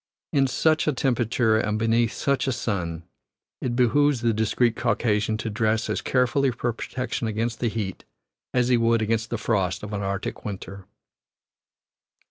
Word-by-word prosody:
In 135 -2 +4
such 155 +5 +2
a 150 - +3
temperature 120 -3 +1
and 105 -1 0
beneath 115 +1 +2
such 140 -1 0
a - - +2
sun 90 -10 -3 0.6
it 120 -2 -1
behooves 130 +2 +3
the 115 -1 +2
discreet 110 +2 +1
Caucasian 110 -1 +1
to 115 0 -3
dress 110 0 0
as - - -1
carefully 130 +2 +2
for 120 -1 -2
protection 125 0 -3
against 110 +2 -2
the 120 - +1
heat 105 -4 -4 0.5
as 125 -1 +2
he 125 - +5
would 115 -1 +2
against 110 0 0
the 120 - -2
frost 100 -5 -1
of 105 0 -6
an 100 - -2
Arctic 100 0 -3
winter. 100 -1 -7
115 Hz, 160 wpm, -25 LUFS, 105-125 Hz, 0.6 s, he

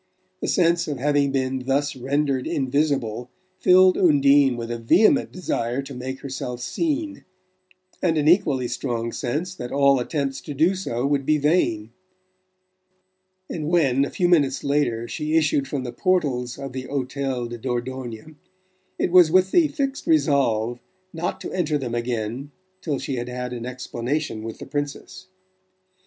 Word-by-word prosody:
The - - -3
sense 170 -1 +2
of 145 -3 -3
having 145 0 +1
been 130 -1 -1
thus 140 +1 0
rendered 135 0 -1
invisible 135 -4 -1 0.3
filled 185 0 +5
Undine 140 -5 +4
with 115 0 -5
a 120 - -3
vehement 215 - +4
desire 135 -7 -2
to 135 - -9
make 130 +1 -6
herself 130 -3 -5
seen, 305 - -2 0.8
and 165 -3 +1
an 150 0 +1
equally 150 -8 +3
strong 120 -2 -3
sense 150 +11 -3
that 125 -9 -7
all 140 -1 +4
attempts 135 +1 -2
to 145 - -7
do 165 +7 +3
so 135 -10 -3
would 140 -1 +1
be 155 +3 +2
vain; 120 -8 +1 1.6
and 155 -2 -4
when, 140 -6 +3
a 140 - -2
few 180 - 0
minutes 145 -6 +2
later, 130 -5 0
she 155 +5 -1
issued 145 -3 +1
from 135 -1 -3
the 120 -1 -6
portals 130 -7 0
of 135 -2 -7
the 130 -1 -5
Hotel 135 -2 -2
de 120 0 -7
Dordogne 125 +2 -5 0.6
it - - 0
was 180 -3 +7
with 185 +2 +3
the 340 -3 +5
fixed 280 -1 -3
resolve 125 - +2 0.3
not 165 +1 -3
to - - -6
enter 155 -5 0
them 125 -4 -4
again 120 +2 -3 0.3
till 150 -4 -2
she 135 0 -4
had 120 +1 -4
had 125 0 -4
an 120 0 -5
explanation 125 0 -3
with 115 0 -7
the - - -9
Princess. 145 +6 -5
140 Hz, 155 wpm, -23 LUFS, 125-155 Hz, 1.6 s, was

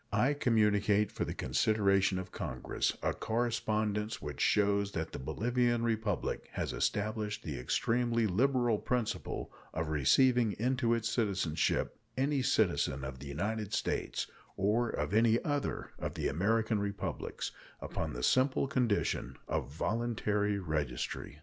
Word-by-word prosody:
I 135 +4 +3
communicate, 105 -5 +3
for - - -2
the - - -4
consideration 100 - +2
of 95 0 -5
Congress, 65 0 -2
a - - +1
correspondence 110 -2 -1
which 75 -2 -6
shows 100 -1 +2
that 80 -1 -3
the - - -6
Bolivian 120 - +1
Republic 110 -5 -1
has - - -2
established 105 0 -1
the - - -4
extremely 115 - +1
liberal 120 +2 +2
principle 125 -4 -2 0.2
of 80 -1 -1
receiving 115 - +4
into 120 +1 +1
its 115 -1 -1
citizenship 100 -9 0 0.2
any 135 +1 +2
citizen 85 - +1
of 65 -1 -6
the 70 - -8
United 100 +8 -2
States, - - -1 0.3
or 105 +4 +2
of 75 +6 -2
any 115 +1 +4
other 145 -2 -2
of - - -4
the - - -1
American 110 - +1
Republics, 100 0 -3 0.3
upon - - -4
the 60 +1 -5
simple 130 - +3
condition 125 -7 0
of - - -2
voluntary 105 +2 0
registry. 75 -9 -3
105 Hz, 130 wpm, -32 LUFS, 95-120 Hz, 0.3 s, receiving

